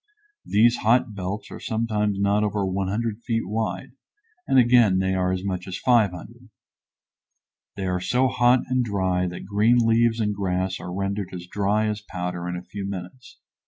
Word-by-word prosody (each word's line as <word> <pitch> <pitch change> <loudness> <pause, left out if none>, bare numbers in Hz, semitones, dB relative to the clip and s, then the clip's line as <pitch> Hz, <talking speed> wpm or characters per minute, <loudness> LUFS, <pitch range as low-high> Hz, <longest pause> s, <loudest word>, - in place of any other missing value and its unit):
These 120 +3 +4
hot 115 0 +2
belts 100 +1 -5
are - - -8
sometimes 105 -3 -1
not 100 +1 +2
over 105 -1 0
100 100 +4 -2
feet 115 -4 -2
wide, 105 -3 -3 0.6
and - - +3
again 120 -6 +5
they 95 0 +1
are 90 -1 0
as 95 0 -2
much 95 -2 -3
as 95 - -4
500. 115 0 0 1.3
They 95 - -4
are 90 -1 -1
so 125 +7 +2
hot 125 0 +3
and 130 0 0
dry 95 -4 0
that 90 0 -7
green 105 +4 +3
leaves 115 0 +3
and 105 -2 0
grass 95 -1 -2
are 90 - -7
rendered 100 +1 -3
as 90 -1 -7
dry 105 +3 0
as 105 -1 -2
powder 90 -3 -5
in 90 - -3
a 90 - -6
few 100 0 -6
minutes. 100 +7 -8
100 Hz, 170 wpm, -24 LUFS, 95-115 Hz, 1.3 s, again